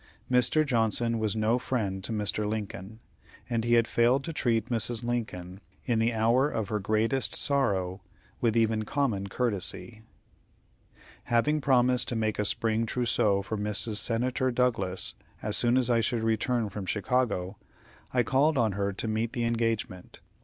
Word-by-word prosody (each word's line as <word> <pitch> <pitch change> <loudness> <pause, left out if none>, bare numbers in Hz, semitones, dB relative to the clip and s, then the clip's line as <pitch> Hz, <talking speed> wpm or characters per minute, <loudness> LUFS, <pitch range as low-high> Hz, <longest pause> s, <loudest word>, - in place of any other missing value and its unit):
Mr. 125 +5 +3
Johnson 115 -2 +1
was 110 -1 0
no 110 +3 +1
friend 100 -7 -2
to - - -2
Mr. 105 0 -1
Lincoln, 105 0 -6 0.5
and 115 -2 -1
he 120 0 +3
had 115 -1 +3
failed 125 +4 +2
to 165 - -5
treat 115 -6 0
Mrs. 115 +1 +1
Lincoln, 100 -7 -4 0.3
in 120 -3 +1
the 115 +1 +2
hour 115 +5 +2
of 110 -5 -3
her 105 -2 -1
greatest 110 +3 0
sorrow, 95 -9 0 0.4
with 115 -1 +1
even 110 -1 +2
common 110 -6 -1
courtesy. 110 0 -2 1.2
Having 150 +6 +1
promised 125 -2 +3
to 120 - 0
make 110 -1 -1
a 105 - +1
spring 110 +2 0
trousseau 110 -5 +1
for 110 +3 -4
Mrs. 105 +1 0
Senator 125 +3 0
Douglas 115 -7 +1 0.3
as 105 -1 0
soon 120 +1 +3
as 130 -2 +2
I 115 - +3
should 115 +1 -1
return 115 +1 0
from 100 -1 -7
Chicago, 105 -2 -1 0.5
I 125 -1 +2
called 140 +6 +2
on 115 -4 +2
her 100 +1 -1
to 105 - -4
meet 110 +1 -1
the 120 - -2
engagement. 115 -5 -2
115 Hz, 160 wpm, -28 LUFS, 105-120 Hz, 1.2 s, Mr